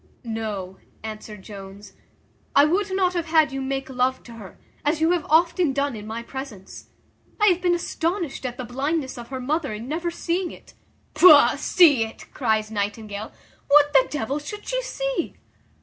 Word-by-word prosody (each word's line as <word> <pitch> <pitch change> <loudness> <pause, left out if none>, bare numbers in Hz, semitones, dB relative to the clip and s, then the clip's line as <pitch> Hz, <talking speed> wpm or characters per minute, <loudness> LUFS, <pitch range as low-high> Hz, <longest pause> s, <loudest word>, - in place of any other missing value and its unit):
"No," 215 -5 -5 0.2
answered 215 -2 -8
Jones, 195 0 -11 0.6
"I 280 - +7
would 390 +6 +1
not 375 -1 +1
have 340 -2 -2
had 315 -3 +4
you 270 0 -4
make 270 0 -3
love 260 0 0
to 240 - -13
her, 210 -5 -11 0.3
as 295 +2 +1
you 320 +2 +3
have 350 -3 0
often 335 -1 +3
done 280 -2 -1
in 210 0 -8
my 225 +2 -5
presence. 235 -7 -9 0.5
I 420 - +4
have 360 -1 +1
been 355 -1 +3
astonished 340 -2 -2
at 245 -1 -4
the 255 - -5
blindness 270 +2 -2
of 235 - -9
her 260 0 -5
mother 280 0 -1
in 225 +3 -7
never 330 +4 -2
seeing 345 +1 -2
it." - - -14 0.4
"Pugh, 340 +4 +7
see 295 -10 +5
it!" 225 - -10
cries 220 -3 0
Nightingale. 205 0 -4 0.4
"What, 290 +1 +5
the 265 -2 +5
devil 280 0 -2
should 415 +8 -8
she - - -1
see?" - - -3
270 Hz, 175 wpm, -24 LUFS, 220-335 Hz, 0.6 s, I